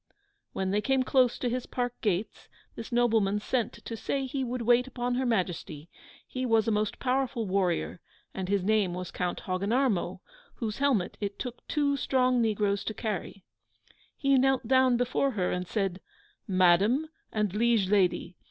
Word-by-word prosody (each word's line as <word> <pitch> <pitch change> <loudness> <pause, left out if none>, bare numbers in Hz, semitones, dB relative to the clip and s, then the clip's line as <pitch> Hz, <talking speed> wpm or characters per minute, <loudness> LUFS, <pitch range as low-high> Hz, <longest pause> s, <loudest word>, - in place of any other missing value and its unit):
When 190 0 -1
they 205 +1 +1
came 265 +2 +2
close 255 -2 +3
to 250 - -2
his 250 +1 -2
park 245 -1 -2
gates, 205 -1 -2 0.3
this 225 - -8
nobleman 225 -4 +2
sent 235 +1 -1
to 230 - -4
say 270 +4 -2
he 265 +1 -3
would 250 -1 -3
wait 245 +2 +4
upon 245 -1 -2
Her 255 +1 0
Majesty: 175 -7 -2 0.3
he 255 - -5
was 225 -3 +2
a - - +2
most 210 0 0
powerful 255 -3 -1
warrior, 185 -3 -1 0.3
and 190 -1 -4
his 200 -2 +1
name 200 -3 +2
was 180 0 -5
Count 180 -1 -3
Hogginarmo, 195 -1 0 0.4
whose 220 -1 -4
helmet 265 -10 +1
it 200 -1 -3
took 245 -2 -7
two 285 -2 +1
strong 255 -2 +2
negroes 205 -3 +1
to 220 - -3
carry. 200 -3 -4 0.7
He 275 -2 +3
knelt 265 -2 +2
down 260 -1 +4
before 245 +3 +1
her 185 -4 0
and 180 0 -3
said, 195 -3 -2 0.5
'Madam 195 - +3 0.2
and 210 -3 -1
liege 225 -2 +2
lady! 185 -3 +1
225 Hz, 165 wpm, -28 LUFS, 195-255 Hz, 0.7 s, wait